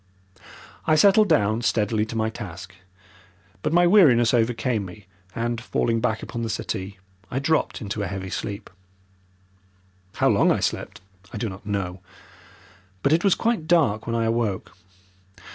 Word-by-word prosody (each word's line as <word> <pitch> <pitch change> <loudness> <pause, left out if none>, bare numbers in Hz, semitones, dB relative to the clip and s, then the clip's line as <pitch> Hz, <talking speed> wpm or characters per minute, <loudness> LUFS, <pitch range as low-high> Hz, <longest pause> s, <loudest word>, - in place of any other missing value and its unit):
I 155 - +4
settled 200 +5 +5
down 110 -7 +2
steadily 110 -1 0
to 115 - -7
my 110 0 0
task, 100 -3 -9 0.9
but 150 - -1
my 175 +1 +4
weariness 145 - +5
overcame 115 -1 +1
me 95 +1 -11 0.3
and, 120 0 -2
falling 115 -1 0
back 110 -2 -1
upon 120 - -5
the 115 - -3
settee, 100 -2 -4 0.3
I 125 - -4
dropped 155 +1 0
into 105 -1 -4
a 100 - -2
heavy 95 0 -6
sleep. 100 +1 -5 1.4
How - - +2
long - - +4
I - - +1
slept - - -3 0.3
I - - -6
do 110 +1 -2
not 95 +3 -11
know, 95 -3 -3 1.0
but 140 - +3
it 165 - +2
was 200 -3 +4
quite 225 -9 -1
dark 140 -12 +2
when 115 - -1
I 115 - +1
awoke. 115 -5 -2
115 Hz, 155 wpm, -24 LUFS, 105-135 Hz, 1.4 s, settled